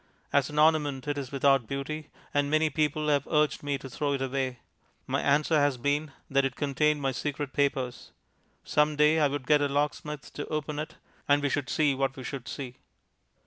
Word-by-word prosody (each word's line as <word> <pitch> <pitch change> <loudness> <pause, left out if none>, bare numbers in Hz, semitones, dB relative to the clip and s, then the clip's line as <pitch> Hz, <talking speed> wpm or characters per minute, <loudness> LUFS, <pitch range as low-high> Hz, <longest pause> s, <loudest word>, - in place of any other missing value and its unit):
As 140 -2 +3
an 150 - -7
ornament 150 -3 +3
it 145 - 0
is 135 -1 -6
without 135 -3 +3
beauty, 145 +3 -4 0.2
and 145 0 +2
many 155 +1 +2
people 150 +1 0
have 145 -1 +2
urged 150 -1 +2
me 145 -1 -1
to 135 - -9
throw 140 +2 -1
it 135 - -2
away. 130 -1 -2 0.5
My - - -1
answer 150 +3 +3
has 145 -2 +2
been 145 +3 0 0.2
that 140 0 +2
it 135 -2 -1
contained 150 +1 +1
my 135 - +1
secret 145 +1 -3
papers. 140 -3 -1 0.5
Some 150 0 +2
day 150 +2 +4
I 150 - +4
would 140 -1 -4
get 150 0 +4
a 145 - +2
locksmith 145 +1 -2
to 145 - -5
open 150 -1 -3
it, 155 - -5 0.3
and 145 0 +5
we 145 - +2
should 140 -1 -1
see 150 -3 +2
what 135 0 -1
we 130 - -8
should 130 -1 -6
see. 130 -3 -6
145 Hz, 200 wpm, -28 LUFS, 135-150 Hz, 0.5 s, and